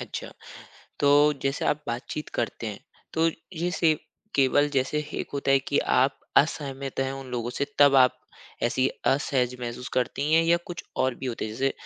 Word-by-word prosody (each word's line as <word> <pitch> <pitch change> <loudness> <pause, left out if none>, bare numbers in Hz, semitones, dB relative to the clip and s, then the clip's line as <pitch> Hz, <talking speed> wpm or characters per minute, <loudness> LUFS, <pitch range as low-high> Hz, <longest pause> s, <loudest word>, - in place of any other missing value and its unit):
अच्छा। - - -6 0.7
तो 140 - +4 0.3
जैसे 135 +1 -1
आप 150 0 +1
बातचीत 120 +5 -4
करते 120 0 -2
हैं 105 -2 -6 0.3
तो 165 +1 +3 0.3
ये 175 +2 -1
सिव 160 -3 +2 0.4
केवल 145 +2 +4
जैसे 135 +1 0 0.2
एक - - -4
होता 140 -1 -1
है 135 - +6
कि 140 +2 -1 0.2
आप 135 +2 +2 0.2
असहमत 140 -3 +1
हैं 135 0 -1
उन 135 0 -7
लोगों 120 -1 -2
से 135 - -1
तब 140 -1 +7
आप 130 -1 +5 0.4
ऐसी 130 +2 +2 0.2
असहज 130 -3 +1
महसूस 120 +1 -5
करती 140 +4 0
हैं 165 +1 +6
या 170 +1 +4
कुछ 175 - -6 0.2
और 130 -1 0
भी 130 - -7
होते 120 -2 -3
हैं 110 - -4
जैसे 135 +4 0
135 Hz, 180 wpm, -26 LUFS, 125-145 Hz, 0.7 s, तब